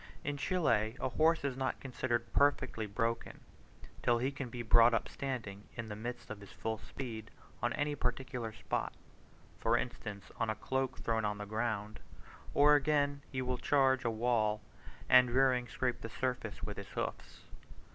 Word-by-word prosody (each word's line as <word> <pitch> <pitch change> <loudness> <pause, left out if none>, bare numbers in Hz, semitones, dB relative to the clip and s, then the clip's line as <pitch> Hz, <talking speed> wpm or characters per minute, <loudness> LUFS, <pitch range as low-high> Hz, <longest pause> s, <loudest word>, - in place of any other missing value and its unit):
In 145 0 -1
Chile 125 - +1
a 130 - 0
horse 160 +5 +3
is 140 -2 -1
not 130 0 -1
considered 120 -2 -2
perfectly 140 -6 +2
broken, 115 +3 -2 0.6
till 120 - +3
he 130 +4 0
can 135 -3 -5
be 120 0 -5
brought 115 +1 +6
up 115 - 0
standing, 110 -7 -5
in 115 -1 -5
the 105 - -4
midst 120 +3 -6
of 110 - -6
his 100 - -11
full 110 -1 -3
speed, 115 -5 -6 0.3
on 120 - +1
any 145 0 0
particular 125 -3 -2
spot, 115 - -2 0.7
for 115 +1 +3
instance, 105 -5 -5
on 115 - 0
a 110 - 0
cloak 130 +1 -1
thrown 115 -1 0
on 105 0 0
the 105 - -5
ground: 110 -1 -2 0.6
or, 145 +1 +7
again, 145 -1 +2
he 130 -1 -1
will 125 0 -1
charge 135 -2 +3
a 120 - +1
wall, 110 -2 +1 0.4
and 125 -1 +7
rearing, 125 0 +3
scrape 125 +3 -1
the 115 - -5
surface 125 +1 -3
with - - -4
his - - -6
hoofs. - - -4
120 Hz, 170 wpm, -34 LUFS, 110-135 Hz, 0.7 s, or